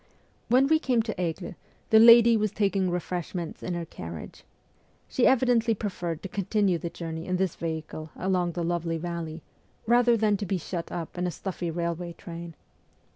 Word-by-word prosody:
When 255 +3 +5
we 315 +3 +4
came 250 -7 +1
to 220 -1 -3
Aigle, 175 +2 -3 0.4
the 220 - +8
lady 230 0 +8
was 215 -1 +1
taking 195 -3 +1
refreshments 175 -1 -4
in 180 - -3
her 170 -1 -3
carriage. 85 - -9 0.6
She 250 - +2
evidently 240 -3 +3
preferred 175 -6 -4
to - - -3
continue 195 -2 0
the 170 - -4
journey 165 -1 -6
in 185 - 0
this 190 -2 0
vehicle 160 -1 -5
along 180 -2 0
the 175 - -2
lovely 165 -1 -1
valley, 165 -1 -5 0.4
rather 240 +1 +4
than 210 -2 +2
to 205 - -4
be 190 - 0
shut 170 0 -5
up 175 0 -5
in 180 - 0
a - - 0
stuffy 175 0 -4
railway 170 +1 -3
train. 170 -1 -9
180 Hz, 175 wpm, -27 LUFS, 170-215 Hz, 0.6 s, the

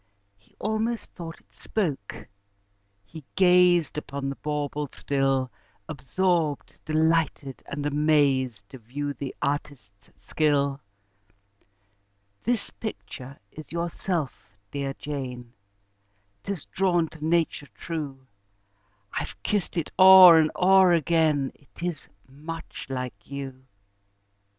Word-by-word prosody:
He 100 - -31
almost 220 +2 -2
thought 165 -2 -8
it - - -33
spoke: 150 - -3 0.8
he 155 +9 -11
gazed 180 -4 +4
Upon 140 -1 -5
the 140 - -4
bauble 150 -1 -3
still, 135 -2 0 0.4
Absorbed, 155 +2 -1
delighted, 155 -3 0
and 145 +1 -4
amazed, 140 -7 +2
To 130 - -11
view 145 +5 -4
the 140 -1 -6
artist's 140 -8 -4
skill. 140 -2 0 1.6
"This 240 -3 0
picture 140 - -8
is 155 - -11
yourself, 170 - -3
dear 140 -1 -3
Jane 125 -5 -6 0.9
'Tis 195 -6 -5
drawn 175 -3 +1
to 155 -2 -12
nature 160 -2 0
true: 145 -5 -6 0.9
I've - - -4
kissed 205 -3 -1
it 165 - -2
o'er 185 -3 +10
and 155 -1 +3
o'er 190 -1 +5
again, 155 -4 +2
It 145 +4 -15
is 175 -3 -3 0.2
much 155 +5 -8
like 125 -6 -5
you." 135 -2 -7
150 Hz, 105 wpm, -26 LUFS, 135-170 Hz, 1.6 s, o'er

